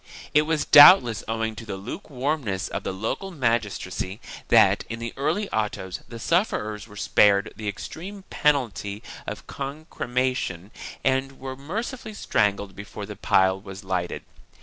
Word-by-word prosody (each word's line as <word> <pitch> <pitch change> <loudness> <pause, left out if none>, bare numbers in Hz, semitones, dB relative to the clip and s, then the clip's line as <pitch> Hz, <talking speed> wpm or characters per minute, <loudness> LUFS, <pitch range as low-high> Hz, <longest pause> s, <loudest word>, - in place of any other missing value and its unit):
It 150 - +6
was 160 -2 +1
doubtless 145 - +8
owing 110 0 -2
to - - -7
the 105 -3 -5
lukewarmness 125 - -3
of - - -3
the - - -2
local 110 - -3
magistracy 110 - -2 0.3
that, - - +5
in 115 - -4
the 115 0 -5
earlier 155 +10 0
autos, 105 -4 -2
the 115 - -7
sufferers 110 - 0
were 105 - -14
spared 100 0 +3
the 110 - -6
extreme 185 - -6
penalty 110 - 0 0.2
of - - -6
concrema 130 -3 -2
tion 95 -3 -5 0.3
and 135 0 0
were 130 0 -6
mercifully 215 - -5
strangled 100 - 0
before 105 0 -7
the 105 0 -8
pile 95 0 +2
was 95 0 -9
lighted. 90 -2 -2
115 Hz, 145 wpm, -25 LUFS, 100-145 Hz, 0.3 s, doubtless